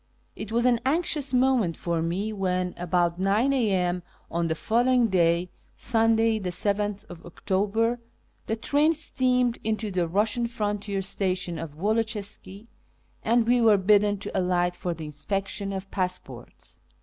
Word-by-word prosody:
It 215 Hz, -, -7 dB
was 235 Hz, +1 st, +1 dB
an 245 Hz, -2 st, +4 dB
anxious 295 Hz, -1 st, 0 dB
moment 250 Hz, -9 st, +2 dB
for 170 Hz, -1 st, -1 dB
me 190 Hz, +6 st, -2 dB
when, 185 Hz, -2 st, -1 dB
about 175 Hz, 0 st, 0 dB
9 210 Hz, +8 st, +2 dB
a.m. 185 Hz, -8 st, +1 dB, 0.3 s
on 170 Hz, 0 st, 0 dB
the 160 Hz, -, -1 dB
following 240 Hz, +5 st, +2 dB
day 170 Hz, -1 st, +2 dB, 0.3 s
(Sunday, 225 Hz, -1 st, +2 dB
7th 205 Hz, +2 st, -1 dB, 0.2 s
October), 205 Hz, +6 st, -1 dB, 0.5 s
the 220 Hz, -, 0 dB
train 290 Hz, +7 st, +2 dB
steamed 250 Hz, -5 st, +1 dB
into 215 Hz, -1 st, -1 dB
the 180 Hz, -2 st, 0 dB
Eussian 220 Hz, +6 st, +1 dB
frontier 205 Hz, -3 st, -2 dB
station 185 Hz, -3 st, -2 dB
of 155 Hz, -2 st, -7 dB
Woloczyska, 210 Hz, 0 st, -2 dB, 0.6 s
and 230 Hz, +1 st, +2 dB
we 245 Hz, +1 st, +3 dB
were 220 Hz, -3 st, +6 dB
bidden 205 Hz, +1 st, +3 dB
to 200 Hz, -, -7 dB
alight 180 Hz, -1 st, +1 dB
for 175 Hz, -1 st, -3 dB
the 160 Hz, -1 st, -7 dB
inspection 195 Hz, +6 st, -3 dB
of 195 Hz, 0 st, -6 dB
passports. 185 Hz, -1 st, -5 dB
205 Hz, 135 wpm, -26 LUFS, 180-230 Hz, 0.6 s, were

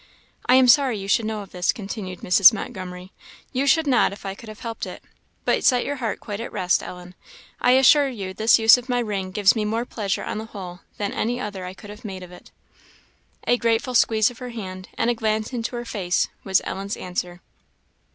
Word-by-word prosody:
"I 250 Hz, -, +6 dB
am 260 Hz, -1 st, +6 dB
sorry 260 Hz, -3 st, +5 dB
you 195 Hz, -1 st, -6 dB
should 215 Hz, +3 st, +2 dB
know 215 Hz, -1 st, -3 dB
of 195 Hz, -, -16 dB
this," 180 Hz, 0 st, +1 dB
continued 195 Hz, -3 st, -7 dB
Mrs. 185 Hz, +2 st, +7 dB
Montgomery; 185 Hz, -4 st, -7 dB, 0.4 s
"you 270 Hz, +2 st, 0 dB
should 320 Hz, +3 st, +4 dB
not 255 Hz, -8 st, +3 dB
if 200 Hz, -, -11 dB
I 195 Hz, -, -3 dB
could 220 Hz, +3 st, -12 dB
have 215 Hz, -, -11 dB
helped 230 Hz, -2 st, -5 dB
it. -, -, -9 dB, 0.4 s
But -, -, +1 dB
set 250 Hz, -2 st, +3 dB
your 285 Hz, 0 st, -3 dB
heart 230 Hz, -4 st, -3 dB
quite 205 Hz, -1 st, -6 dB
at 230 Hz, -, -6 dB
rest, 180 Hz, -3 st, +1 dB
Ellen; 180 Hz, 0 st, -9 dB, 0.5 s
I 250 Hz, -, +4 dB
assure 270 Hz, +2 st, +6 dB
you 195 Hz, -7 st, -6 dB
this 220 Hz, +3 st, +4 dB
use 225 Hz, +2 st, +7 dB
of 245 Hz, +1 st, -13 dB
my 245 Hz, -, +1 dB
ring 205 Hz, -5 st, -2 dB
gives 200 Hz, +2 st, +3 dB
me 220 Hz, -, 0 dB
more 225 Hz, +3 st, -1 dB
pleasure 205 Hz, -5 st, -3 dB
on -, -, -4 dB
the 220 Hz, -, -6 dB
whole 185 Hz, -5 st, -9 dB, 0.2 s
than 205 Hz, -1 st, -2 dB
any 240 Hz, +3 st, -1 dB
other 200 Hz, -6 st, -5 dB
I 180 Hz, +1 st, -7 dB
could 205 Hz, +1 st, -11 dB
have 210 Hz, -, -12 dB
made 190 Hz, -4 st, -7 dB
of 180 Hz, -, -12 dB
it." 180 Hz, -, -14 dB, 1.0 s
A 245 Hz, -, +3 dB
grateful 235 Hz, +3 st, 0 dB
squeeze 220 Hz, -1 st, +3 dB
of 240 Hz, -, -15 dB
her 250 Hz, -, -6 dB
hand 185 Hz, -5 st, -7 dB
and 240 Hz, +1 st, +1 dB
glance 220 Hz, +1 st, -1 dB
into 235 Hz, 0 st, -3 dB
her 240 Hz, 0 st, -5 dB
face 190 Hz, -6 st, -1 dB
was 190 Hz, -2 st, +2 dB
Ellen's 195 Hz, +2 st, -4 dB
answer. 180 Hz, -1 st, -5 dB
215 Hz, 220 wpm, -23 LUFS, 190-240 Hz, 1.0 s, Mrs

